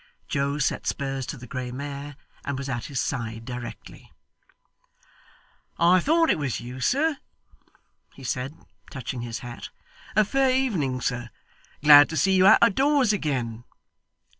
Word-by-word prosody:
Joe 140 0 -1
set 145 - -1
spurs 135 -2 -3
to - - -5
the 120 - -10
grey 125 0 -5
mare, 140 +2 -6 0.3
and 140 -1 -3
was 140 0 -5
at 120 -3 -3
his 135 -3 -4
side 115 -3 -3
directly. 125 -1 -9 1.7
'I 175 +2 +5
thought 325 - +3
it - - 0
was 135 -5 -2
you, 125 +2 -8
sir,' 285 - +1 1.0
he 135 - -13
said, 130 +3 -3 0.3
touching 130 -2 -5
his 115 -2 -5
hat. 120 -1 -8 0.5
'A 215 -1 +5
fair 270 +4 +2
evening, 190 - 0
sir. 120 -1 -2 0.5
Glad 145 -1 +9
to 160 - -4
see 195 +3 +3
you 185 0 +5
out 215 - +7
of 230 -3 +5
doors 270 -2 +3
again. 125 - -2
140 Hz, 150 wpm, -25 LUFS, 125-190 Hz, 1.7 s, Glad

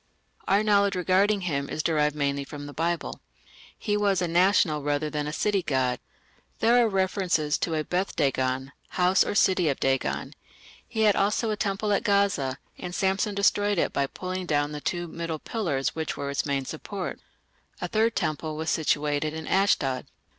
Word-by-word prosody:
Our 200 +2 +3
knowledge 200 -2 +3
regarding 190 +3 +2
him 140 -6 -2
is 155 - -3
derived 150 -2 +1
mainly 140 -1 -1
from 145 +1 -8
the 145 - -8
Bible. 170 +2 -2 0.6
He 205 -2 -1
was 205 -2 +2
a 175 - 0
national 175 -3 +3
rather 145 +1 -1
than 150 -1 -2
a - - -3
city 200 +4 +1
god. 130 -6 0 0.6
There 240 +2 +4
are 230 - +2
references 185 -6 +1
to 165 - -1
a 155 - 0
Beth 180 +5 -2
dagon, 130 -2 0 0.3
"house 180 +1 +4
or - - -3
city 185 -5 +3
of 140 - -1
Dagon"; 135 0 -1 0.5
he 220 -2 -2
had 210 -2 +5
also 210 +3 +1
a - - 0
temple 205 0 -1
at - - +2
Gaza, 200 - +1 0.2
and 180 0 -5
Samson 195 +2 0
destroyed 205 0 +2
it - - +1
by 140 0 +1
pulling 185 +3 -5
down 145 -1 +1
the 150 -1 -6
two 175 +2 -2
middle 165 -1 -4
pillars 155 - -2
which 160 -1 -3
were 140 0 -3
its 140 - -1
main 140 -1 -1
support. 180 +6 -5 0.6
A - - -3
third 225 +1 +1
temple 155 0 -2
was 160 +1 -2
situated 150 0 0
in 160 0 -6
Ashdod. 145 -10 +1
170 Hz, 180 wpm, -26 LUFS, 145-200 Hz, 0.6 s, had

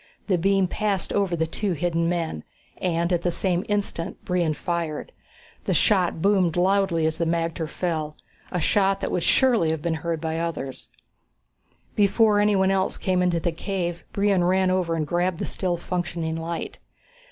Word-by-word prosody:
The 185 -4 +1
beam 195 +2 +3
passed 200 -1 -1
over 195 -4 +1
the 160 -1 0
two 190 +4 -2
hidden 170 +1 0
men, 165 - -2 0.4
and 170 0 0
at 170 - +1
the 175 - +1
same 180 +1 0
instant 205 -5 -2
Brion 175 -4 +1
fired. 170 - -3 0.5
The - - +1
shot 180 -6 +2
boomed 190 -4 +3
loudly 185 -3 +2
as 160 0 -1
the 170 - +1
magter 165 -1 -1
fell 155 -4 -3 0.3
a 180 - -1
shot 195 +2 +2
that - - -2
would 180 - 0
surely 235 -6 +3
have 160 -1 -2
been 170 -1 0
heard 170 -1 -2
by 160 0 -2
the - - -1
others. 150 -6 -5 1.1
Before 210 +1 +4
anyone 200 -2 +3
else 190 0 0
came 185 -1 +1
into 175 -2 +2
the 170 +1 -1
cave, 175 0 -3
Brion 200 -3 +2
ran 185 +1 +3
over 180 -3 +1
and 155 -2 -1
grabbed 175 +2 0
the - - -3
still 180 -2 -2
functioning 170 -2 -3
light. 165 +1 -5
175 Hz, 175 wpm, -24 LUFS, 165-190 Hz, 1.1 s, Before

